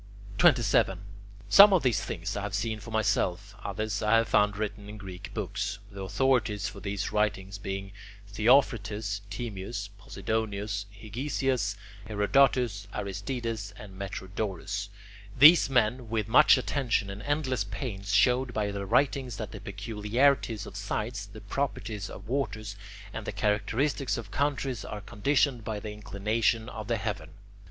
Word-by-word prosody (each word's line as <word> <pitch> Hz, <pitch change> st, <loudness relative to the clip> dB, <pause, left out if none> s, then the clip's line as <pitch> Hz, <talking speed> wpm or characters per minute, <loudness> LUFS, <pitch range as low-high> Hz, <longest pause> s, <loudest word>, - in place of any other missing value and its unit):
27. 100 Hz, -5 st, +4 dB, 0.5 s
Some 200 Hz, +1 st, +9 dB
of 185 Hz, -, +3 dB
these 125 Hz, -4 st, +2 dB
things 85 Hz, +3 st, -4 dB
I 100 Hz, -, -2 dB
have 100 Hz, 0 st, -3 dB
seen 110 Hz, +1 st, -1 dB
for 115 Hz, -, -10 dB
myself, 100 Hz, -2 st, 0 dB
others 100 Hz, 0 st, -2 dB
I 105 Hz, +1 st, +4 dB
have 115 Hz, 0 st, +1 dB
found 105 Hz, -1 st, +3 dB
written 105 Hz, -1 st, -4 dB
in 105 Hz, -, -8 dB
Greek 95 Hz, -3 st, -8 dB
books, 100 Hz, 0 st, -3 dB
the 100 Hz, -1 st, -8 dB
authorities 105 Hz, +1 st, +1 dB
for -, -, -8 dB
these 100 Hz, 0 st, -3 dB
writings 105 Hz, -2 st, -1 dB
being 95 Hz, 0 st, -5 dB, 0.4 s
Theophrastus, 105 Hz, -2 st, +2 dB
Timaeus, 100 Hz, -2 st, -5 dB
Posidonius, 100 Hz, 0 st, -3 dB
Hegesias, 115 Hz, 0 st, -2 dB, 0.3 s
Herodotus, 110 Hz, -1 st, +2 dB
Aristides, 105 Hz, +1 st, -4 dB
and 100 Hz, -3 st, -11 dB
Metrodorus. 100 Hz, +1 st, -4 dB, 0.5 s
These 150 Hz, +4 st, +8 dB
men 125 Hz, -1 st, +1 dB
with 110 Hz, -2 st, -1 dB
much 135 Hz, +5 st, +7 dB
attention 125 Hz, -6 st, 0 dB
and 100 Hz, +1 st, -7 dB
endless 135 Hz, -6 st, 0 dB
pains 100 Hz, 0 st, -5 dB
showed 125 Hz, +4 st, +3 dB
by 105 Hz, -1 st, 0 dB
their 100 Hz, -1 st, -4 dB
writings 130 Hz, -2 st, +1 dB
that -, -, -5 dB
the -, -, -8 dB
peculiarities 115 Hz, +1 st, 0 dB
of -, -, -10 dB
sites, 105 Hz, +2 st, -3 dB
the 105 Hz, +1 st, -11 dB
properties 110 Hz, -7 st, -3 dB
of 95 Hz, +2 st, -10 dB
waters, 110 Hz, -5 st, -2 dB, 0.4 s
and 110 Hz, -1 st, -6 dB
the -, -, -1 dB
characteristics 115 Hz, +7 st, 0 dB
of 110 Hz, -4 st, -7 dB
countries 135 Hz, -3 st, -1 dB
are 105 Hz, -, -6 dB
conditioned 125 Hz, +3 st, +1 dB
by 105 Hz, -1 st, -3 dB
the 105 Hz, +1 st, -6 dB
inclination 110 Hz, +2 st, 0 dB
of 110 Hz, -3 st, -7 dB
the 115 Hz, -1 st, +1 dB
heaven. 105 Hz, -2 st, -4 dB
105 Hz, 145 wpm, -29 LUFS, 100-120 Hz, 0.5 s, Some